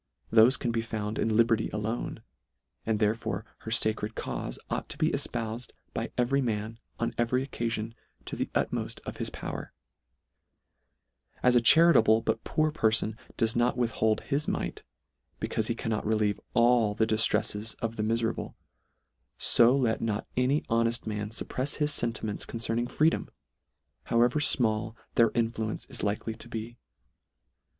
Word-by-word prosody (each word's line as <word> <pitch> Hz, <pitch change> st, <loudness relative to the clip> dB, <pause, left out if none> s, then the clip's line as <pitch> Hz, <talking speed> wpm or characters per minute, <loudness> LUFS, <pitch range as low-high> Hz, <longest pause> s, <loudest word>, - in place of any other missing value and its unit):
Thole 115 Hz, +1 st, +8 dB
can 120 Hz, -, -1 dB
be 115 Hz, 0 st, 0 dB
found 110 Hz, -2 st, -4 dB
in 110 Hz, -1 st, +1 dB
liberty 115 Hz, -1 st, +3 dB
alone, 110 Hz, +3 st, -4 dB, 0.6 s
and 110 Hz, -1 st, +2 dB
therefore 110 Hz, +1 st, -1 dB
her -, -, -8 dB
facred 110 Hz, -1 st, 0 dB
caufe -, -, -4 dB
ought -, -, -3 dB
to -, -, -4 dB
be -, -, +2 dB
efpoufed 115 Hz, +2 st, -4 dB, 0.2 s
by -, -, -3 dB
every 130 Hz, +3 st, +2 dB
man, 110 Hz, -2 st, -3 dB, 0.2 s
on 115 Hz, 0 st, -1 dB
every 125 Hz, +3 st, +1 dB
occalion, 115 Hz, -4 st, -3 dB, 0.3 s
to -, -, -5 dB
the -, -, -2 dB
utmoft -, -, -1 dB
of -, -, -6 dB
his -, -, -2 dB
power: -, -, -6 dB, 1.7 s
as 125 Hz, -, +5 dB
a 120 Hz, -, +6 dB
charitable 120 Hz, -6 st, +6 dB
but 110 Hz, 0 st, -1 dB
poor 155 Hz, 0 st, +1 dB
per 115 Hz, -8 st, +2 dB
fon 110 Hz, 0 st, +1 dB, 0.2 s
does 115 Hz, -2 st, +1 dB
not 120 Hz, +1 st, +2 dB
withhold 110 Hz, -2 st, +1 dB
his 145 Hz, +2 st, -2 dB
mite, -, -, -3 dB, 0.6 s
becaufe 110 Hz, -, -1 dB
he 115 Hz, -, -1 dB
cannot 115 Hz, -2 st, -2 dB
relieve 105 Hz, -1 st, +1 dB, 0.2 s
all 120 Hz, -3 st, +4 dB
the 110 Hz, -, +2 dB
diftreffes 110 Hz, -1 st, 0 dB
of 115 Hz, -1 st, -3 dB
the 110 Hz, -, -2 dB
mife 115 Hz, +2 st, 0 dB
rable, 115 Hz, -, -3 dB, 0.8 s
fo 120 Hz, +3 st, +5 dB
let 120 Hz, -5 st, +1 dB
not 110 Hz, -2 st, -1 dB
any 130 Hz, +4 st, +2 dB
honeft 115 Hz, +1 st, 0 dB
man 105 Hz, -1 st, -3 dB
fupprefs 130 Hz, +5 st, -2 dB
his 150 Hz, 0 st, +1 dB
fentiments 110 Hz, -3 st, -2 dB
concerning 115 Hz, +1 st, -1 dB
freedom, 155 Hz, +5 st, +1 dB, 0.8 s
however 120 Hz, +5 st, +3 dB
fmall 115 Hz, -6 st, +2 dB, 0.2 s
their 115 Hz, -1 st, +5 dB
influence 115 Hz, -2 st, -1 dB
is -, -, -4 dB
likely 105 Hz, +2 st, -2 dB
to 115 Hz, +2 st, -11 dB
be. 115 Hz, +1 st, -6 dB
115 Hz, 150 wpm, -28 LUFS, 110-120 Hz, 1.7 s, Thole